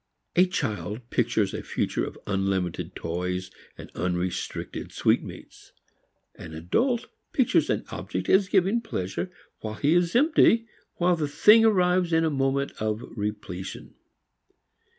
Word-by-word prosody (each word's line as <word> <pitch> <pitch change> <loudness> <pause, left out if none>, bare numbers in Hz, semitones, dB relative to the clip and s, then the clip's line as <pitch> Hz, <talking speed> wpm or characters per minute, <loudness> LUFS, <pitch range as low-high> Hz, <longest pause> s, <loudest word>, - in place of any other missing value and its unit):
A 180 +2 +5
child 110 - -3
pictures 115 -4 +1
a - - -3
future - - -2
of - - -6
unlimited 95 -3 -1
toys 90 +2 -3 0.3
and - - -10
unrestricted 90 +1 -3
sweetmeats. - - -2 0.6
An 80 -1 -10
adult 235 - 0 0.3
pictures - - +3
an - - 0
object - - -4
as 195 0 +4
giving 200 +4 +3
pleasure 95 - -3 0.3
while 110 -1 -5
he 145 +8 +2
is 175 +1 +2
empty 245 -5 +5 0.3
while 175 0 +2
the 155 -3 -1
thing 210 +10 +6
arrives 180 -5 +3
in 165 0 +4
a 160 - +1
moment 135 0 0
of 110 +2 -1
repletion. 105 -4 -5
135 Hz, 130 wpm, -26 LUFS, -, 0.6 s, thing